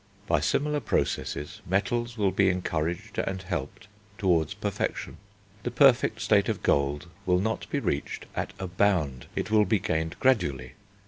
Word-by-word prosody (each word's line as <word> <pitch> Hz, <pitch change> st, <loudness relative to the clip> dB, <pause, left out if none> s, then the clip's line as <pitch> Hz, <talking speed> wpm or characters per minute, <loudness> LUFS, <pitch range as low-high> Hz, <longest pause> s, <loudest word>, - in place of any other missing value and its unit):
By 85 Hz, -6 st, +2 dB
similar 145 Hz, -, +1 dB
processes 75 Hz, -, -2 dB
metals 120 Hz, +5 st, -1 dB
will 100 Hz, -3 st, +2 dB
be 95 Hz, +1 st, +3 dB
encouraged 85 Hz, -2 st, -2 dB
and 95 Hz, 0 st, -1 dB
helped 95 Hz, +1 st, -5 dB, 0.3 s
towards 85 Hz, -8 st, +2 dB
perfection. -, -, -3 dB, 0.4 s
The 120 Hz, -, -2 dB
perfect 130 Hz, 0 st, +4 dB
state -, -, +3 dB
of -, -, -2 dB
gold 70 Hz, +4 st, +1 dB, 0.2 s
will 90 Hz, -1 st, +4 dB
not 110 Hz, +3 st, -2 dB
be -, -, 0 dB
reached 70 Hz, -, -2 dB
at -, -, -2 dB
a 95 Hz, -, -4 dB
bound; 90 Hz, -8 st, +1 dB
it -, -, -2 dB
will 105 Hz, -1 st, +5 dB
be 105 Hz, +3 st, +2 dB
gained 80 Hz, -3 st, -1 dB
gradually. 75 Hz, -, +1 dB
95 Hz, 150 wpm, -27 LUFS, 80-110 Hz, 0.4 s, will